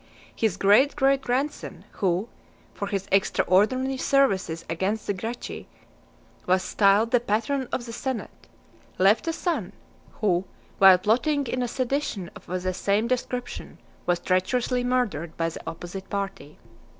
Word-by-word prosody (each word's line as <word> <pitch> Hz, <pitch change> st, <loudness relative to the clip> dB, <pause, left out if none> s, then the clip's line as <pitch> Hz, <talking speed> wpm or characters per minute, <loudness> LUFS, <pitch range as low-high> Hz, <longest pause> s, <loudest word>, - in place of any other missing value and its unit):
His 215 Hz, -5 st, 0 dB
great 215 Hz, +10 st, +4 dB
great 275 Hz, -1 st, +3 dB
grandson, 265 Hz, +4 st, -3 dB
who, 190 Hz, +2 st, 0 dB, 0.5 s
for 200 Hz, -, -4 dB
his 195 Hz, -1 st, -3 dB
extraordinary 215 Hz, +7 st, +2 dB
services 195 Hz, -13 st, +1 dB
against 190 Hz, +6 st, -2 dB
the 205 Hz, -, 0 dB
Gracchi, 225 Hz, +6 st, -6 dB, 0.8 s
was 185 Hz, 0 st, +3 dB
styled 205 Hz, +3 st, +3 dB
the 245 Hz, -, +5 dB
"Patron 240 Hz, +4 st, -1 dB
of 240 Hz, -, -2 dB
the 230 Hz, -, -7 dB
Senate," 260 Hz, 0 st, -5 dB, 0.5 s
left 195 Hz, -, +4 dB
a -, -, +2 dB
son, 345 Hz, 0 st, -2 dB, 0.4 s
who, 185 Hz, -4 st, +1 dB, 0.4 s
while 190 Hz, -1 st, +9 dB
plotting 255 Hz, -, +1 dB
in 255 Hz, +1 st, -2 dB
a 245 Hz, -, 0 dB
sedition 250 Hz, -7 st, -2 dB
of -, -, -13 dB
the 185 Hz, +1 st, -2 dB
same 205 Hz, +4 st, +1 dB
description, 250 Hz, 0 st, -3 dB, 0.3 s
was 175 Hz, -1 st, +3 dB
treacherously 240 Hz, +8 st, 0 dB
murdered 225 Hz, -11 st, -1 dB
by 165 Hz, 0 st, 0 dB
the 165 Hz, -, -9 dB
opposite 175 Hz, +3 st, -8 dB
party. 195 Hz, -7 st, -5 dB
215 Hz, 140 wpm, -25 LUFS, 185-255 Hz, 0.8 s, while